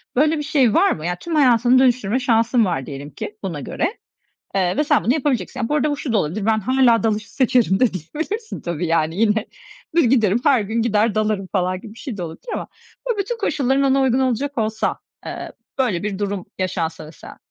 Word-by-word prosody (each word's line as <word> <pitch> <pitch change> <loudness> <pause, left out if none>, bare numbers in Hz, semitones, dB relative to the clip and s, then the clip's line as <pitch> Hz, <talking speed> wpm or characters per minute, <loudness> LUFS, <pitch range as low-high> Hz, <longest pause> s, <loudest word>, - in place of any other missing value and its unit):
böyle 305 +4 +3
bir 295 - -3
şey 270 -7 +2
var 390 +4 +4
mı? 155 +1 -4
Ya, 180 - -1
tüm 335 -2 -4
hayatını 250 -2 +5
dönüştürme 250 -2 +2
şansın 235 -2 +2
var 135 -8 -2
diyelim 140 +1 -7
ki 210 +9 -7
buna 170 -6 -3
göre, 345 - -2 0.6
eee, 180 +1 +1
ve 300 - +3
sen 295 -1 +2
bunu 245 - +3
yapabileceksin. 255 - -1
Bu 295 - +1
arada 300 0 +1
bu 290 - -2
şu 260 -5 -3
da 215 - +4
olabilir: 195 +5 -1
"Ben 220 -1 +3
hâlâ 245 0 +3
dalışı 215 -2 -1
seçerim." 245 -7 +3
de 250 -6 +3
diyebilirsin 320 - -5
tabii 170 0 -3
yani. 160 0 +1
Yine 215 -1 +2 0.5
bir, 340 - +5
"Giderim, 225 -4 +3
her 260 -6 +4
gün 220 +3 -1
gider 215 -1 +1
dalarım." 215 -3 0
falan 185 -1 -1
gibi 215 - -11
bir 230 - -15
şey 240 -7 -6
de 180 - -4
olabilir 165 - -9
ama - - -4 0.4
bu 450 - 0
bütün 430 +4 -2
koşulların 275 - +1
ona 270 0 +3
uygun 260 -1 +2
olacak 265 +2 -1
olsa, 220 0 -1 0.3
eee, - - -6 0.3
böyle 210 -10 +1
bir 205 -1 -3
durum 200 -2 -3
yaşansa 165 -4 -2
mesela 155 - -12
225 Hz, 210 wpm, -21 LUFS, 195-265 Hz, 0.6 s, hayatını